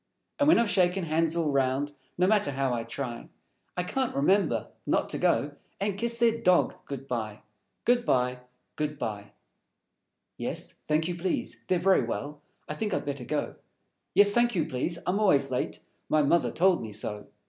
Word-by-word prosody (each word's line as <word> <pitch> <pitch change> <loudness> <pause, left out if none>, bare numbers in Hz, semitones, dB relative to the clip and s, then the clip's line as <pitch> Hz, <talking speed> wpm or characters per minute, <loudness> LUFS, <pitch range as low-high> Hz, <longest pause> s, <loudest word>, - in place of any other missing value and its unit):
And 285 - +3
when 320 - +7
I've 235 0 +3
shaken 185 -1 +2
hands 165 0 +1
all 165 -3 +1
round, 135 +1 +1 0.3
No 180 - +3
matter 210 -1 +3
how 135 -1 0
I 115 -1 -2
try, 120 0 -6 0.5
I 180 - +1
can't 260 +7 -2
remember 190 +9 +2 0.2
Not - - +1
to - - -2
go - - +2 0.3
And 200 0 -1
Kiss 235 +3 -1
their 230 -1 +3
Dog 180 -1 +4
good 135 -1 -6
by, 110 -4 -4 0.4
Good 245 0 +3
by, 125 - +1 0.4
Good 150 -1 -2
by! 105 -6 -5 1.0
Yes, - - -4
thank 155 +1 +1
you, 175 - -2
please. 175 +1 -3
They're 185 - +2
Very 190 +2 +4
Well; 145 +1 -5 0.3
I - - -3
think 205 +4 -2
I'd - - -3
better 140 -3 -4
go. 150 +4 -2 0.6
_Yes, 205 0 +7
thank 240 +1 +2
you, 165 - +1
please. 135 +7 -1
I'm 185 +4 +1
always 190 -10 +3
late; - - -2 0.3
My 155 -1 +3
Mother 170 +4 +3
told 185 +1 +3
me 110 - -6
so. 105 0 -4
165 Hz, 180 wpm, -28 LUFS, 135-195 Hz, 1.0 s, when